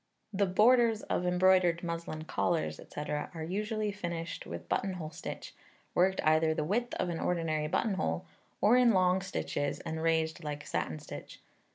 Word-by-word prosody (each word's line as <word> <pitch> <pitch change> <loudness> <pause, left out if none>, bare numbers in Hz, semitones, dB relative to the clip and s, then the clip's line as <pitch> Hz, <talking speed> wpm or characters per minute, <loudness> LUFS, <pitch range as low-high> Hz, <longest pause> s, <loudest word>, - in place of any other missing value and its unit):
The 200 0 +2
borders 225 +3 +4
of 180 - -1
embroidered 180 -1 +4
muslin 170 -2 -4
collars, 165 +1 0
&c., - - -8
are 160 +2 -3
usually 210 +3 -1
finished 170 -4 -5
with - - -7
buttonhole 180 -5 -2
stitch, - - -7 0.4
worked 190 +2 +3
either 155 0 +3
the 155 - 0
width 235 +9 -1
of 180 - -1
an 170 - -3
ordinary 160 -3 0
buttonhole, 150 - 0 0.4
or 215 +4 +6
in 245 -2 +5
long 185 0 +3
stitches, 145 -6 -2
and 160 0 -4
raised 160 0 +1
like 145 -1 -5
satin 80 - -2
stitch. - - -9
175 Hz, 155 wpm, -31 LUFS, 160-195 Hz, 0.4 s, or